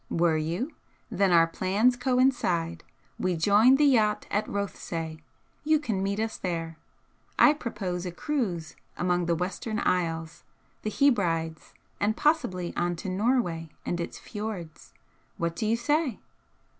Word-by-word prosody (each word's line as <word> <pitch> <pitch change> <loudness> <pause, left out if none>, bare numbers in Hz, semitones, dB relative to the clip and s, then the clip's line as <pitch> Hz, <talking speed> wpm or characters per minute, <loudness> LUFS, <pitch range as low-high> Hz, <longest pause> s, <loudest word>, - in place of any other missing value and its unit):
"Were 170 -1 +2
you? 170 - -2 0.4
Then 195 -2 +2
our 165 -1 +6
plans 195 +8 +2
coincide. 240 -10 +1 0.4
We 185 -1 0
join 210 +9 +6
the 295 +2 +4
yacht 220 -6 +3
at 210 +2 0
Rothesay 165 -5 -4 0.4
you 310 +1 +4
can 225 -10 -2
meet 200 +1 -1
us 220 0 -2
there. 165 -3 -4 0.6
I 300 - +7
propose 195 - -4
a - - -4
cruise 185 - -2 0.2
among 175 -1 +1
the 170 - +2
Western 190 +5 -3
isles 165 -4 -1 0.4
the 215 - -2
Hebrides 170 - +1 0.2
and 215 +2 +1
possibly 185 - +1
on 175 0 0
to 170 - -5
Norway 185 -5 0 0.2
and 175 - -2
its 170 - -5
fjords. 205 -7 -7 0.5
What 170 0 -1
do 215 - -2
you 225 +2 +2
say?" 295 0 0
190 Hz, 140 wpm, -27 LUFS, 170-230 Hz, 0.6 s, I